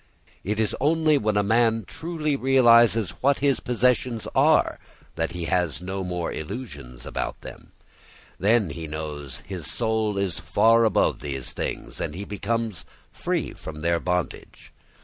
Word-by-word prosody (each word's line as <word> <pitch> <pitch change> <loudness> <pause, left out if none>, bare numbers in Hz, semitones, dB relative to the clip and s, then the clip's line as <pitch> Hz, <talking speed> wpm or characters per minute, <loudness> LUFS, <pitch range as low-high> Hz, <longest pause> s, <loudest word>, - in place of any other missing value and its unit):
It 105 +3 -2
is 110 -3 +1
only 155 0 +3
when 105 -1 0
a 105 - +3
man 115 +1 +2
truly 155 - -3
realises 120 -6 +5
what 140 +1 +3
his 140 -2 +2
possessions 125 -1 0
are - - +3 0.4
that 80 0 -2
he 85 -1 -4
has 85 -3 0
no 95 +2 -4
more 90 -2 -3
illusions 75 - -7
about - - -4
them; - - -11 0.7
then 105 -3 +3
he 80 +2 -6
knows 75 -2 -6
his 90 -5 -6
soul 110 -3 0
is 100 -4 -1
far 115 +2 +4
above 110 - +2
these 70 -3 -5
things - - -5
and 75 - -3
he 100 +3 -5
becomes 105 -2 -2 0.3
free - - -2
from 75 -1 -8
their 85 +1 +1
bondage. 90 0 -4
105 Hz, 150 wpm, -25 LUFS, 85-120 Hz, 0.7 s, realises